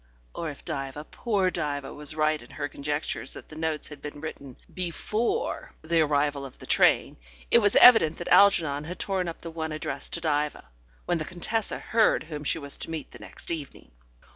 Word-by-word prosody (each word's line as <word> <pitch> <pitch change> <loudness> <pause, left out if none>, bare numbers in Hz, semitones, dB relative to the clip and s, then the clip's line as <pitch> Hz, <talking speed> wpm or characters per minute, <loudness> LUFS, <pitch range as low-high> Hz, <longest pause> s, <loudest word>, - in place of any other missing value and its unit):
." - - -33
or 165 - -4
if 145 - -10
Diva 140 -2 -4
poor 200 -6 +1
Diva 145 -5 -3
was 150 +1 -6
right 155 0 +1
in 120 - -14
her 145 - -4
conjectures 145 +2 -3
that - - -11
the 155 - -10
notes 160 -1 -1
had 150 -2 -11
been 145 0 -7
written 140 -4 -8 0.2
before 215 - -2
the 165 +1 +2
arrival 145 -1 +1
of 135 -2 -9
the - - -11
train, - - +3 0.3
it - - +7
was 205 -1 +2
evident 225 -11 +8
that 175 - -6
Algernon 155 -8 +5
had 180 +3 -6
torn 190 -2 -1
up 165 - -6
the 165 - -6
one 160 -1 -4
addressed 155 - -4
to - - 0
Diva, 150 - -1 0.4
when 175 -1 0
the - - -2
Contessa 200 +6 -1
heard 225 -1 +2
whom 150 -2 -7
she 150 - 0
was 140 -3 -4
to - - -4
meet 160 -1 -5
the - - -12
next - - -8
evening. 150 - -6
155 Hz, 200 wpm, -27 LUFS, 145-175 Hz, 0.4 s, evident